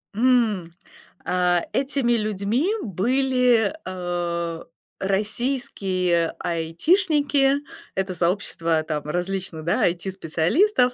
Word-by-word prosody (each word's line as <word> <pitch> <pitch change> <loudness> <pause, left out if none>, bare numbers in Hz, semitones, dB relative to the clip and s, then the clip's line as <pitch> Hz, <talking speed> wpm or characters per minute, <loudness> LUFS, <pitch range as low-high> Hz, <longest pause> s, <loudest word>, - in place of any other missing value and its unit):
М. 220 -7 +2 0.5
А, 180 -1 +2
этими 270 -3 +1
людьми 215 - 0
были, 250 - +2
э, 175 -2 -3 0.4
российские 195 -5 0
айтишники- 285 - +2 0.4
это 190 -1 -1
сообщество 170 -2 0
там 155 -2 -3
различных, 175 0 -3
да, 170 - +1
IT-специалистов, 190 - +1
190 Hz, 75 wpm, -23 LUFS, 170-250 Hz, 0.5 s, М